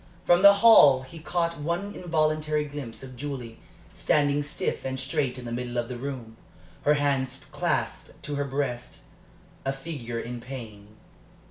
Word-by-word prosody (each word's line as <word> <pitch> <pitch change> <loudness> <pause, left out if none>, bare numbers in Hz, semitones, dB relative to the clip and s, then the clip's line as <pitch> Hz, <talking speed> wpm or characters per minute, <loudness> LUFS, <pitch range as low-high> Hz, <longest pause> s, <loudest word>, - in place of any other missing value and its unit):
From 175 +1 +5
the 200 0 +9
hall 140 - +8
he 145 +6 -11
had 155 - -13
caught 170 -1 0
one 170 +7 -2
involuntary 155 -3 0
glimpse 140 -5 -7
of 130 -1 -9
Julie, 125 -4 -6 0.3
standing 145 -1 +2
stiff 145 - -3
and 130 0 -3
straight 130 -1 -1
in 125 - -8
the 120 - -5
middle 120 0 -3
of 120 -1 -1
the 125 - -4
room, 120 -4 -6 0.5
her 150 - +5
hands 135 -2 -1
clasped - - -2
to 145 - -4
her 145 0 -1
breast 135 -3 -3 0.6
a 135 - 0
figure 135 -5 -5
in 120 +1 -5
pain. 115 -6 -9
140 Hz, 160 wpm, -27 LUFS, 125-150 Hz, 0.6 s, the